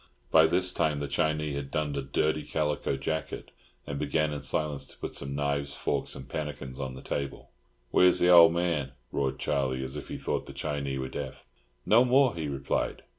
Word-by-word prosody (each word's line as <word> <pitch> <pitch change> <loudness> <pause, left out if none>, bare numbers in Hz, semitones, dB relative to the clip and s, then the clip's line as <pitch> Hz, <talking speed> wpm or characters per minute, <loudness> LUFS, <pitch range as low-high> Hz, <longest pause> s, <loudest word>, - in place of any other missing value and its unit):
By 80 0 +7
this 90 +2 +2
time 75 -2 +1
the 70 - -3
Chinee 75 +1 0
had 70 -1 -4
donned 75 -1 -1
a 70 - -1
dirty 75 +3 0
calico 75 -2 -1
jacket, 80 +4 -4 0.3
and 70 0 -4
began 75 +1 0
in 70 - -4
silence 75 -3 -1
to - - -15
put - - -5
some 70 0 -5
knives, 70 0 -1
forks, - - -2
and 65 - -9
pannikins 70 -3 -5
on 65 -2 -4
the - - -10
table. 70 -1 -4 0.4
"Where's 90 0 +6
the 90 - +4
old 85 -2 +9
man?" 85 -6 -1 0.2
roared 65 -1 -1
Charlie, 65 -1 -1
as 65 +2 -5
if 75 - -6
he - - -5
thought - - -2
the - - -8
Chinee 70 -3 -3
were 65 -1 -3
deaf. - - -6 0.4
"No 115 +4 +6
more," 130 0 +4
he 80 -3 -4
replied. 70 -1 -2
75 Hz, 195 wpm, -29 LUFS, 70-80 Hz, 0.4 s, old